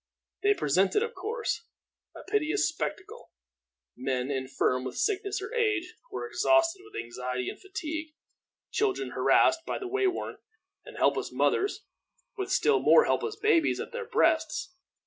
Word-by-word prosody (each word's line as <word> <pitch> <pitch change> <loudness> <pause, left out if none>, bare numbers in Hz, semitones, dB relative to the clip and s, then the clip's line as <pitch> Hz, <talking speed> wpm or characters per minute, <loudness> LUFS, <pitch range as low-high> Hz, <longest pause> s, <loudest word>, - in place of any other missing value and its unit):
They 410 0 +4
presented, 190 - +2
of 465 0 -4
course, 445 +4 -3 0.5
a - - -9
piteous 400 -2 +1
spectacle 425 +4 -5 0.7
men 130 +1 -2
infirm 130 -1 0
with 130 -1 -6
sickness 405 -1 -1
or 470 - -6
age, 420 -7 0 0.2
or - - -4
exhausted 335 -3 +2
with 420 0 -8
anxiety 125 +1 -4
and - - -9
fatigue; 315 -4 -5 0.6
children 415 -3 0
harassed 330 - +4
and 380 -2 -4
way 400 -1 +2
worn; 365 - -3 0.5
and - - -11
helpless - - +1
mothers, 400 +1 0 0.5
with 390 -1 -4
still 425 +2 +3
more 475 - +6
helpless 440 -2 0
babes 425 -6 +2
at - - -5
their 475 -2 -5
breasts. 365 -3 +1
380 Hz, 140 wpm, -28 LUFS, 310-425 Hz, 0.7 s, more